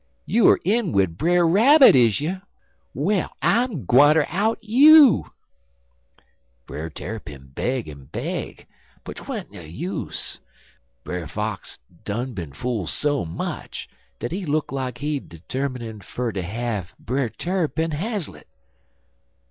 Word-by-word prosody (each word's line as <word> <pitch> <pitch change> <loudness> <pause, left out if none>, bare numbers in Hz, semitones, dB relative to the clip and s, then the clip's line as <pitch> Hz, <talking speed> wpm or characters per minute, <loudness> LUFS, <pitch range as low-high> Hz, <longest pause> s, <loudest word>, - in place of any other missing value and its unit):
You 230 -2 +4
er - - +6
in 205 -2 +1
wid 95 -4 +2
Brer 175 - +3
Rabbit, 260 - +7
is 115 -5 +4
you? 185 +5 -3 0.5
Well, 180 +7 0
I'm 200 - +1
gwineter 145 - +5
out 210 +6 0
you.' 280 +4 +7 1.3
"Brer 80 +3 -6
Tarrypin 75 -9 -8
beg 125 - -2
en 70 -3 -10
beg, - - -5 0.4
but - - -8
'twan't - - -6
no - - -10
use. 85 +4 -5 0.6
Brer 90 -3 -5
Fox 105 +1 -5 0.3
done 120 +5 -3
been 85 -8 -6
fool 110 - -3
so 145 - -1
much 80 - -6 0.3
dat 120 - -5
he 190 +3 -3
look 155 -3 -1
like 130 -2 -3
he 145 +2 -2
termin' 120 - -6
fer 120 +3 -4
ter 95 - -3
have 105 -1 -4
Brer 130 0 -2
Tarrypin 165 -1 -2
haslett. 195 +3 -4
130 Hz, 125 wpm, -23 LUFS, -, 1.3 s, Rabbit